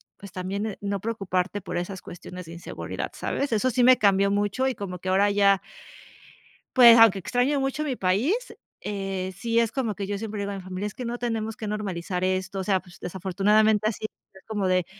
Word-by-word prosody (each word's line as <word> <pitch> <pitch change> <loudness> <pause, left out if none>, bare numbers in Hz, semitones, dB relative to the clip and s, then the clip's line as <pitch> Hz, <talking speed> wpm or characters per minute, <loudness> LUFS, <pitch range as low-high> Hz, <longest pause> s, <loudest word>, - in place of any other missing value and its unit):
pues 200 -2 -12
también, 190 +3 -3
eh, 210 - -6
no 200 -1 -3
preocuparte 200 -3 -2
por 185 - -6
esas 180 +2 -4
cuestiones 180 +1 -9
de 165 - -10
inseguridad, 170 - -6
¿sabes? 280 -1 -2
Eso 230 +3 +2
sí 245 +1 +2
me 255 0 +7
cambió 200 -1 +3
mucho, 205 +5 0
y 255 - -3
como 180 -3 -6
que 185 - -4
ahora 195 +2 +4
ya 200 -1 +4 1.2
pues 235 -2 +9
aunque 225 -4 +7
extraño 250 +8 +1
mucho 270 +3 -1
mi 265 -4 -2
país, 200 - +2 0.5
eh, 195 -2 -3
sí 230 +1 0
es 230 -1 +2
como 235 -6 -1
que 200 0 -4
yo 205 0 -3
siempre 215 0 -5
le 200 - -2
digo 200 - -3
a 200 - -5
mi 190 - -7
familia, 185 +2 -4
es 210 - -6
que 250 - -6
no 240 +1 -3
tenemos 225 -2 -2
que 220 - -6
normalizar 185 -3 -3
esto, 185 +1 -1
o - - -3
sea, 190 -1 +2
pues, 180 0 -17
desafortunadamente 205 +4 +2
así 215 0 -3 0.3
es, 190 - -16
como 205 -3 -1
de 185 -2 +2
200 Hz, 215 wpm, -25 LUFS, 185-225 Hz, 1.2 s, pues